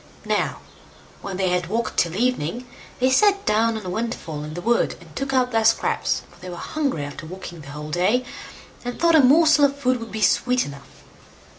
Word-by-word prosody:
Now, -, -, -1 dB, 0.6 s
when 195 Hz, -2 st, -5 dB
they 190 Hz, -1 st, +1 dB
had 180 Hz, -1 st, 0 dB
walked 230 Hz, +5 st, -2 dB
till 170 Hz, 0 st, +1 dB
evening, 240 Hz, -1 st, -1 dB, 0.3 s
they 255 Hz, +1 st, +3 dB
sat 400 Hz, +7 st, +3 dB
down 225 Hz, +1 st, +2 dB
on 215 Hz, -, -8 dB
a -, -, -4 dB
windfall 180 Hz, -9 st, -4 dB
in 155 Hz, +1 st, -7 dB
the -, -, -4 dB
wood, 235 Hz, +5 st, +1 dB
and 165 Hz, -4 st, -17 dB
took 270 Hz, +6 st, -3 dB
out 255 Hz, -2 st, +2 dB
their 225 Hz, -1 st, +2 dB
scraps, 225 Hz, +1 st, +1 dB
for -, -, -20 dB
they 185 Hz, -, -8 dB
were 175 Hz, -, -6 dB
hungry 275 Hz, -, -2 dB
after 145 Hz, +2 st, -8 dB
walking 175 Hz, -2 st, -9 dB
the 145 Hz, -, -11 dB
whole 150 Hz, +1 st, -7 dB
day, 205 Hz, +10 st, +1 dB, 0.6 s
and 245 Hz, 0 st, -5 dB
thought 335 Hz, 0 st, +4 dB
a 315 Hz, -, +7 dB
morsel 300 Hz, +2 st, +6 dB
of 280 Hz, 0 st, 0 dB
food 255 Hz, -2 st, +1 dB
would 230 Hz, 0 st, -8 dB
be 220 Hz, -, -4 dB
sweet 250 Hz, 0 st, +2 dB
enough. 140 Hz, -1 st, -12 dB
225 Hz, 205 wpm, -23 LUFS, 175-255 Hz, 0.6 s, a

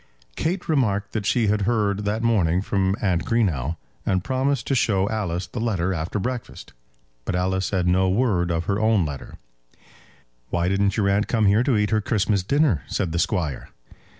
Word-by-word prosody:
Kate 175 Hz, +4 st, -2 dB
remarked 105 Hz, -10 st, +1 dB
that 105 Hz, -3 st, -2 dB
she 120 Hz, -3 st, +2 dB
had 105 Hz, 0 st, +1 dB
heard 105 Hz, -3 st, 0 dB
that 110 Hz, +3 st, -1 dB
morning 95 Hz, -6 st, +2 dB
from 95 Hz, -1 st, 0 dB
Aunt 90 Hz, -4 st, +1 dB
Greenow, 85 Hz, -, 0 dB, 0.3 s
and 95 Hz, -1 st, 0 dB
promised 130 Hz, 0 st, 0 dB
to -, -, -1 dB
show 100 Hz, -6 st, +2 dB
Alice 95 Hz, -5 st, -2 dB
the 90 Hz, +7 st, -7 dB
letter 95 Hz, -5 st, 0 dB
after 85 Hz, +4 st, -3 dB
breakfast. 125 Hz, +4 st, -5 dB, 0.5 s
But 90 Hz, -, -2 dB
Alice 95 Hz, +1 st, 0 dB
said 95 Hz, -3 st, 0 dB
no 95 Hz, +1 st, +3 dB
word 95 Hz, -4 st, +1 dB
of 85 Hz, 0 st, -1 dB
her 100 Hz, +2 st, 0 dB
own 110 Hz, -5 st, +3 dB
letter. 70 Hz, -3 st, -7 dB, 1.1 s
"Why 85 Hz, 0 st, 0 dB
didn't 100 Hz, +2 st, +1 dB
your 100 Hz, -2 st, +2 dB
aunt 100 Hz, +2 st, +1 dB
come 110 Hz, -3 st, +1 dB
here 100 Hz, +3 st, +4 dB
to 125 Hz, -3 st, +2 dB
eat 105 Hz, 0 st, +1 dB
her 110 Hz, -1 st, +2 dB
Christmas 100 Hz, -1 st, +1 dB
dinner?" 135 Hz, -, +2 dB
said 90 Hz, -5 st, -2 dB
the 85 Hz, -, -1 dB
Squire. 85 Hz, -, -1 dB
100 Hz, 180 wpm, -23 LUFS, 90-115 Hz, 1.1 s, here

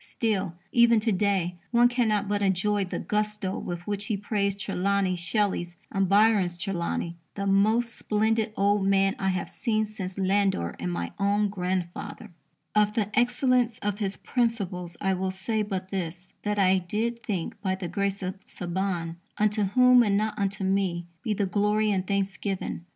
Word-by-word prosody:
Still, 200 Hz, -6 st, -1 dB, 0.2 s
even 235 Hz, -1 st, +5 dB
to 225 Hz, +1 st, +1 dB
day, 190 Hz, -3 st, +1 dB
one 240 Hz, 0 st, +5 dB
cannot 220 Hz, -5 st, +1 dB
but 205 Hz, 0 st, 0 dB
enjoy 200 Hz, +1 st, +1 dB
the 180 Hz, -, -4 dB
gusto 210 Hz, -2 st, -2 dB
with 175 Hz, 0 st, -5 dB
which 205 Hz, 0 st, -2 dB
he 215 Hz, -, 0 dB
praised 200 Hz, -1 st, -1 dB
Trelawney 195 Hz, 0 st, 0 dB
Shelley's 175 Hz, -1 st, -1 dB, 0.2 s
and 195 Hz, -2 st, +1 dB
Byron's 200 Hz, -4 st, +4 dB
Trelawney 170 Hz, -1 st, -2 dB, 0.2 s
"the 200 Hz, -, -3 dB
most 215 Hz, +4 st, +3 dB
splendid 220 Hz, +1 st, +1 dB
old 200 Hz, 0 st, +3 dB
man 195 Hz, 0 st, +3 dB
I 195 Hz, -, -1 dB
have 185 Hz, -1 st, -1 dB
seen 220 Hz, -3 st, 0 dB
since 195 Hz, -3 st, -6 dB
Landor 195 Hz, -, +1 dB
and 90 Hz, 0 st, -2 dB
my 85 Hz, 0 st, -3 dB
own 205 Hz, +1 st, +2 dB
grandfather": 180 Hz, -3 st, -4 dB, 0.4 s
Of 210 Hz, 0 st, +3 dB
the 210 Hz, -2 st, 0 dB
excellence 245 Hz, -1 st, +2 dB
of 205 Hz, 0 st, -1 dB
his 195 Hz, -2 st, -2 dB
principles 195 Hz, -8 st, -2 dB
I 195 Hz, -1 st, +1 dB
will 190 Hz, 0 st, -1 dB
say 195 Hz, +4 st, -1 dB
but 190 Hz, -3 st, -4 dB
this: 180 Hz, -1 st, -5 dB
that 210 Hz, 0 st, -1 dB
I 190 Hz, -1 st, +4 dB
did 225 Hz, +6 st, -2 dB
think, 200 Hz, -3 st, -4 dB
by 190 Hz, -2 st, 0 dB
the 190 Hz, -2 st, -5 dB
grace 200 Hz, +3 st, -2 dB
of 185 Hz, +2 st, -5 dB
Saban 175 Hz, -2 st, -3 dB, 0.2 s
(unto 210 Hz, 0 st, +2 dB
whom, 250 Hz, +5 st, +6 dB
and 205 Hz, -4 st, +3 dB
not 215 Hz, +1 st, 0 dB
unto 200 Hz, -1 st, -2 dB
me, 190 Hz, -3 st, 0 dB, 0.2 s
be 220 Hz, -4 st, -1 dB
the 200 Hz, -, +1 dB
glory 210 Hz, +2 st, +2 dB
and 190 Hz, -2 st, -1 dB
thanksgiving. 195 Hz, -2 st, -2 dB
200 Hz, 165 wpm, -27 LUFS, 185-210 Hz, 0.4 s, whom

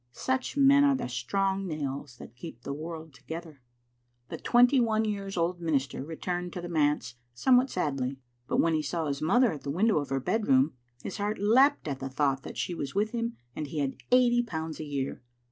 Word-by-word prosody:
Such 260 Hz, +2 st, -2 dB
men 280 Hz, 0 st, +6 dB
are 280 Hz, -1 st, +4 dB
the 260 Hz, -, -3 dB
strong 195 Hz, +10 st, -1 dB
nails 140 Hz, -5 st, -4 dB
that 120 Hz, -, -12 dB
keep 125 Hz, -3 st, -10 dB
the 140 Hz, -, -4 dB
world 160 Hz, +1 st, -7 dB
together. 160 Hz, +1 st, -8 dB, 0.7 s
The -, -, -5 dB
twenty 245 Hz, +2 st, +5 dB
one 220 Hz, -2 st, +2 dB
years 200 Hz, -2 st, -3 dB
old 175 Hz, +1 st, 0 dB
minister 140 Hz, -5 st, -1 dB
returned 175 Hz, +3 st, -4 dB
to -, -, -4 dB
the 175 Hz, -, -5 dB
manse 145 Hz, -7 st, +1 dB, 0.2 s
somewhat 255 Hz, -, +4 dB
sadly, 135 Hz, -6 st, -2 dB, 0.3 s
but -, -, 0 dB
when 165 Hz, 0 st, +3 dB
he 155 Hz, -, +2 dB
saw 160 Hz, +3 st, -2 dB
his 140 Hz, -2 st, -2 dB
mother 235 Hz, +10 st, +4 dB
at 150 Hz, -4 st, -6 dB
the 140 Hz, -, -6 dB
window 195 Hz, +5 st, +2 dB
of 145 Hz, -, -5 dB
her 135 Hz, 0 st, 0 dB
bed 215 Hz, -, -1 dB
room, 135 Hz, +3 st, +4 dB, 0.3 s
his 195 Hz, -, -5 dB
heart 210 Hz, +1 st, -1 dB
leapt 255 Hz, -, +4 dB
at 140 Hz, -2 st, -3 dB
the 135 Hz, -, -4 dB
thought 135 Hz, 0 st, 0 dB
that -, -, -9 dB
she 180 Hz, -, -2 dB
was 140 Hz, -3 st, -5 dB
with 210 Hz, +2 st, +1 dB
him 230 Hz, 0 st, -3 dB, 0.2 s
and 150 Hz, -, -4 dB
he 150 Hz, -, -7 dB
had 140 Hz, -2 st, -1 dB, 0.2 s
eighty 245 Hz, -1 st, +5 dB
pounds 160 Hz, -8 st, -5 dB
a 155 Hz, -, -4 dB
year. 140 Hz, -2 st, -3 dB
165 Hz, 210 wpm, -29 LUFS, 140-215 Hz, 0.7 s, men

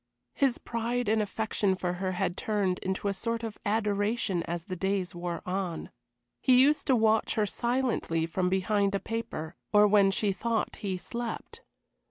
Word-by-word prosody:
His 270 Hz, -3 st, +2 dB
pride 235 Hz, +1 st, -2 dB
and 220 Hz, +1 st, +3 dB
affection 210 Hz, -2 st, 0 dB
for 180 Hz, -1 st, -2 dB
her 185 Hz, -1 st, 0 dB
had 180 Hz, -1 st, -1 dB
turned 200 Hz, -4 st, 0 dB
into 190 Hz, +2 st, -2 dB
a 200 Hz, -, +1 dB
sort 230 Hz, +3 st, -2 dB
of 225 Hz, -2 st, -5 dB
adoration 205 Hz, -2 st, +1 dB
as 170 Hz, 0 st, -3 dB
the 185 Hz, -, -5 dB
days 190 Hz, 0 st, -1 dB
wore 175 Hz, -1 st, -4 dB
on. 185 Hz, -2 st, -3 dB, 0.5 s
He 255 Hz, -2 st, +5 dB
used 290 Hz, +3 st, +4 dB
to 265 Hz, -, +5 dB
watch 220 Hz, -1 st, +2 dB
her 215 Hz, -, +2 dB
silently 235 Hz, -8 st, 0 dB
from 180 Hz, +2 st, 0 dB
behind 200 Hz, +1 st, +1 dB
a -, -, +1 dB
paper, 225 Hz, -9 st, -4 dB, 0.2 s
or 210 Hz, 0 st, +7 dB
when 200 Hz, -1 st, +5 dB
she 200 Hz, +1 st, +1 dB
thought 225 Hz, +4 st, -1 dB
he 190 Hz, -3 st, -3 dB
slept. 235 Hz, +5 st, -6 dB
205 Hz, 170 wpm, -29 LUFS, 185-225 Hz, 0.5 s, or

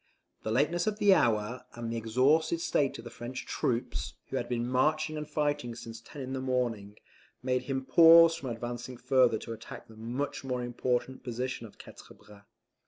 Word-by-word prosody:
The -, -, -4 dB
lateness 160 Hz, -, +1 dB
of 210 Hz, -1 st, 0 dB
the 205 Hz, -2 st, +6 dB
hour, 120 Hz, -, +1 dB
and 115 Hz, -1 st, -4 dB
the -, -, -3 dB
exhausted 130 Hz, +9 st, +2 dB
state 145 Hz, -4 st, 0 dB
of -, -, -10 dB
the 120 Hz, -, -9 dB
French 120 Hz, +2 st, -7 dB
troops, 115 Hz, -, -2 dB
who -, -, -2 dB
had -, -, -3 dB
been 120 Hz, -1 st, -1 dB
marching 155 Hz, +5 st, +1 dB
and 150 Hz, 0 st, -5 dB
fighting 145 Hz, -5 st, -1 dB
since 115 Hz, -1 st, -9 dB
ten 140 Hz, +4 st, -9 dB
in 130 Hz, +1 st, -5 dB
the 130 Hz, -, -3 dB
morning, 120 Hz, -6 st, -2 dB, 0.5 s
made 125 Hz, 0 st, 0 dB
him 135 Hz, -1 st, -2 dB
pause 165 Hz, +2 st, +8 dB
from 140 Hz, -6 st, -5 dB
advancing 120 Hz, +1 st, -5 dB
further 125 Hz, -2 st, +3 dB
to 115 Hz, -, -7 dB
attack 110 Hz, 0 st, -10 dB
the 110 Hz, -, -15 dB
much 120 Hz, +7 st, -4 dB
more 125 Hz, -2 st, -2 dB
important 125 Hz, +1 st, -2 dB
position 125 Hz, -1 st, -4 dB
of 105 Hz, -, -19 dB
Quatre -, -, -13 dB
Bras. 100 Hz, -1 st, -17 dB
125 Hz, 185 wpm, -30 LUFS, 115-145 Hz, 0.5 s, pause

